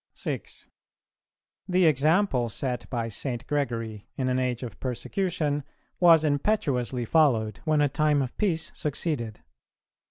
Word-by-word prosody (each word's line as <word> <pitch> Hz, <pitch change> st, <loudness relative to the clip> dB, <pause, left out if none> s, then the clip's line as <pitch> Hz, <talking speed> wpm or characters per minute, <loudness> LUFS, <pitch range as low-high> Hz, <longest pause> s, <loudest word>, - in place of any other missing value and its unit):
6. -, -, -5 dB, 1.0 s
The 180 Hz, -1 st, +3 dB
example 155 Hz, -, +3 dB
set 125 Hz, +1 st, -4 dB
by 120 Hz, -3 st, -2 dB
St. 120 Hz, +2 st, -4 dB
Gregory 115 Hz, -8 st, -2 dB
in 130 Hz, -1 st, -1 dB
an 130 Hz, 0 st, +1 dB
age 125 Hz, -1 st, -1 dB
of 120 Hz, -, -7 dB
persecution 145 Hz, -, -1 dB, 0.4 s
was 165 Hz, -3 st, +7 dB
impetuously 140 Hz, -, 0 dB
followed 115 Hz, -9 st, +2 dB
when 155 Hz, -1 st, +3 dB
a 145 Hz, -, +4 dB
time 150 Hz, 0 st, +2 dB
of 130 Hz, -, -6 dB
peace 175 Hz, -6 st, -1 dB
succeeded. 145 Hz, -7 st, -3 dB
140 Hz, 125 wpm, -27 LUFS, 120-155 Hz, 1.0 s, was